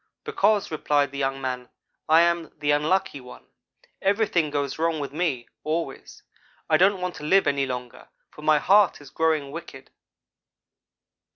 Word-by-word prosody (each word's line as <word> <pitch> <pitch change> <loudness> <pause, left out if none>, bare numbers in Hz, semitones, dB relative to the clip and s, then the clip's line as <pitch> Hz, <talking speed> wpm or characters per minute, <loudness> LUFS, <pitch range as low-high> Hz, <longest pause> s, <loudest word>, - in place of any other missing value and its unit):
"'Because,' 215 - +1
replied 145 -3 +1
the 140 - -6
young 135 0 -1
man, 125 -2 -4 0.4
'I 160 +1 +7
am 170 -1 +1
the 145 -1 0
Unlucky 155 +1 0
one. 125 - -13 0.6
Everything 195 -6 +1
goes 145 0 -3
wrong 165 -1 0
with 140 -1 -5
me, 150 -7 -2 0.2
always. 155 -3 -4 0.4
I 155 - +4
don't 190 +2 +3
want 180 -1 -2
to - - -10
live 190 +6 +3
any 140 -1 +1
longer, 125 -1 -7 0.2
for - - -13
my 155 0 +4
heart 200 +5 +4
is 145 -2 -14
growing 155 -4 0
wicked.' 145 -5 -10
155 Hz, 155 wpm, -24 LUFS, 140-175 Hz, 0.6 s, I